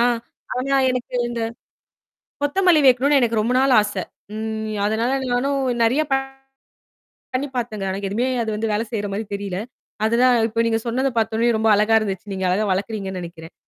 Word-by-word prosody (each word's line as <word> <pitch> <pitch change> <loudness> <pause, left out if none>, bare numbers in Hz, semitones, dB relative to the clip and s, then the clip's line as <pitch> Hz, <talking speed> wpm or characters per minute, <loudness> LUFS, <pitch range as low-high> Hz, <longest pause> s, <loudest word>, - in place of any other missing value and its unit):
ஆ, - - +5 0.5
ஆனா 275 +2 +1
எனக்கு 250 0 -4
இந்தக் 230 -1 -3 0.9
கொத்தமல்லி 335 +1 +4
வைக்கணும்னு 270 +3 +4
எனக்கு 230 -2 +1
ரொம்ப 240 +3 0
நாளா 270 -1 +4
ஆசை. 205 -3 -3 0.3
ம். 220 0 -3
அதனால 225 +4 0 0.2
நானும் 275 +3 +1 0.2
நிறைய 250 +7 +3
ப - - +5 1.2
பண்ணி 280 +3 -1
பார்த்தேங்க. 220 -5 -3
ஆனா 190 - -3
எதுவுமே 225 +6 0 0.2
அது 225 - -2
வந்து 220 0 -2
வேலை 210 +2 0
செய்யற 205 -3 -2
மாதிரி 210 +2 -3
தெரியலே. 200 -2 -4 0.4
அதுதான் 240 +3 +4
இப்ப 230 +1 -2
நீங்கச் 225 0 -1
சொன்னதை 260 +3 0
பார்த்தவுடனே 225 +1 +1
ரொம்ப 220 0 +2
அழகா 215 +2 +3
இருந்துச்சு. 200 -1 -4
நீங்க 190 -1 -2
அழகா 200 +4 +1
வளர்க்கிறீங்கன்னு 190 -1 -3
நினைக்கிறேன். 165 -1 -10
225 Hz, 160 wpm, -21 LUFS, 210-250 Hz, 1.2 s, ஆ